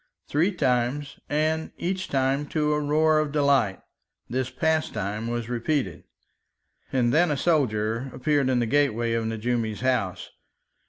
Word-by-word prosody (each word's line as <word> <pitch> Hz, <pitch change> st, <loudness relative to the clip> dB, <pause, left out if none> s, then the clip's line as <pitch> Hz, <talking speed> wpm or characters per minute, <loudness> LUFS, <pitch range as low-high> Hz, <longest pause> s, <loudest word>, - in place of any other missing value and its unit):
Three 165 Hz, +7 st, +2 dB
times, 130 Hz, -2 st, -1 dB
and 155 Hz, +2 st, 0 dB
each 185 Hz, +1 st, -2 dB
time 135 Hz, +2 st, 0 dB
to 150 Hz, -1 st, 0 dB
a 150 Hz, -, +1 dB
roar 155 Hz, +1 st, +3 dB
of 155 Hz, -1 st, -1 dB
delight, 140 Hz, -9 st, +2 dB, 0.5 s
this 130 Hz, 0 st, -2 dB
pastime 130 Hz, -, -1 dB
was 120 Hz, -1 st, -3 dB
repeated, 120 Hz, -, -2 dB, 0.9 s
and 120 Hz, -3 st, +2 dB
then 170 Hz, +3 st, +4 dB
a 145 Hz, -, 0 dB
soldier 120 Hz, -6 st, +1 dB
appeared 140 Hz, 0 st, +1 dB
in 130 Hz, -, +2 dB
the 120 Hz, -, +2 dB
gateway 120 Hz, -3 st, +1 dB
of 115 Hz, -1 st, 0 dB
Nejoumi's 115 Hz, -1 st, -2 dB
house. 115 Hz, -9 st, -1 dB
130 Hz, 140 wpm, -25 LUFS, 115-150 Hz, 0.9 s, then